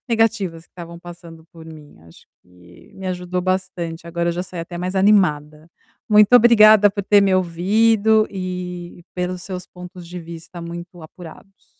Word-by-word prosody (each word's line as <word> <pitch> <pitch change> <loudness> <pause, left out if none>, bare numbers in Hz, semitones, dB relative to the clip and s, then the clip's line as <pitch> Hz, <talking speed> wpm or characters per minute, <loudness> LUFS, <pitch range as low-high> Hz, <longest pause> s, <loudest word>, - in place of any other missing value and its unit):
negativas 210 -8 0
que - - -52
estavam 170 -1 -11
passando 170 -2 -13
por 165 -1 -14
mim. 155 -2 -14
Acho 80 - -19 0.2
que 90 -1 -20
me 190 - -8
ajudou 180 0 -3
bastante, 180 -3 -4
agora 170 0 -2
eu - - 0
já 175 +1 -4
saí 180 -2 -8
até 175 +1 -8
mais 180 +2 -4
animada. 155 -6 +1 0.4
Muito 210 +1 +5
obrigada 215 -3 +7
por 200 0 -5
ter 205 +1 +4
me 195 -1 +2
ouvido 215 +5 +2
e 180 -2 -7
pelos 180 0 -4
seus 185 -1 -7
pontos 180 0 -12
de 180 +1 -8
vista 170 +1 -11
muito 170 +1 -9
apurados. 175 +4 -14
180 Hz, 165 wpm, -20 LUFS, 170-195 Hz, 0.4 s, obrigada